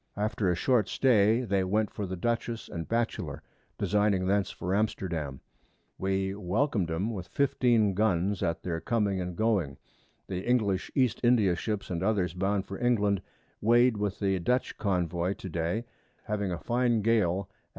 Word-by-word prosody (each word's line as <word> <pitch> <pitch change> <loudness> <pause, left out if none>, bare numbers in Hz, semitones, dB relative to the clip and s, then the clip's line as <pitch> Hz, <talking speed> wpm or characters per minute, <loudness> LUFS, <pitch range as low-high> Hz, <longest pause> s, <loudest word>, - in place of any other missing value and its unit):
After 105 -2 0
a 90 - +2
short 115 +3 +2
Stay 115 -2 +3
they 100 -6 0
went 105 +3 0
for 100 - -4
the 95 - -4
Dutchess 115 +3 -2
and 85 -1 -5
Batchelor, 110 - -2 0.3
designing 105 -3 +1
thence 100 +1 +1
for 90 +2 -4
Amsterdam; 85 -9 -2 0.6
we 95 0 0
welcom'd 100 - 0
'em 95 +8 -1
with 90 -4 -6
15 120 -6 +2
Guns 100 -1 +1
at 85 -4 -1
their 85 -2 -3
coming 105 -5 0
and 90 -1 -4
going; 100 -11 0 0.5
the 95 -1 -4
English 105 -7 +1
East 130 -5 +2
India 115 -7 +4
Ships 105 +2 -3
and 85 -1 -2
others 95 -4 +1
bound 95 +2 0
for 95 - -7
England 105 -5 +2 0.4
weigh'd 120 +2 +4
with 105 -1 -2
the 95 -2 0
Dutch 125 +9 0
Convoy 90 -2 0
to 95 - -8
Day, 85 +8 -2 0.4
having 105 -3 -2
a 90 - -2
fine 120 -2 +1
Gale 100 -4 +2
at 100 - -38
N. - - -37
100 Hz, 165 wpm, -29 LUFS, 90-110 Hz, 0.6 s, India